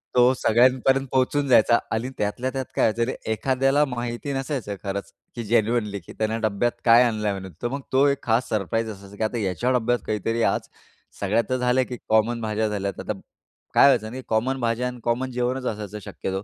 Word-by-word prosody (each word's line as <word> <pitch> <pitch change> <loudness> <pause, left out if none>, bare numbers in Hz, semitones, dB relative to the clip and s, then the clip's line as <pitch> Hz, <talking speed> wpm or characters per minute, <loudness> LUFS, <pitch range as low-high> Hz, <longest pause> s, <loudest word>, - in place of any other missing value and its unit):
तो 125 +1 +6
सगळ्यांपर्यंत 130 +3 +3
पोहोचून 135 +2 +1
जायचा 120 -2 +5
आणि 115 +3 -1
त्यातल्या 105 +5 -1
त्यात 130 -1 -3
व्हायचं, 115 +3 +2 0.2
एखाद्याला 135 +5 +2
माहिती 120 +1 -4
नसायचं 135 -6 -3
खरंच, 100 0 -4 0.2
की 120 - -4
जेन्युइनली 110 -3 +1
त्याने 110 +1 -2
डब्यात 110 +4 0
काय 120 +1 +7
आणलय 110 -3 0
म्हणून. 95 -1 -6
तर - - +2
मग 140 +3 -4
तो 135 +2 +4
एक 140 -1 0
खास 115 +2 +1
सरप्राईज 110 +1 -1
असायचा, 100 -1 -10
की - - -2
आता 110 +2 -1
याच्या 95 +7 0
डब्यात 120 +1 +1
काहीतरी 115 +2 -1
आज - - 0 0.5
सगळ्यात 105 +3 +1
तर 130 - +1
झालं, 125 +1 +2
की 125 - -5
कॉमन 110 +2 +2
भाज्या 110 0 0
झाल्या, 100 -1 -2
आता - - -3 0.6
काय - - +7
व्हायचं 110 -5 +2
नाही 130 +1 -7
कॉमन 125 +5 0
भाज्या 115 +1 0
अन् 125 0 -6
कॉमन 125 +2 -1
जेवणच 125 +1 -1
असायचं 105 -2 -4
शक्यतो. 95 +1 -4
120 Hz, 185 wpm, -24 LUFS, 110-130 Hz, 0.6 s, काय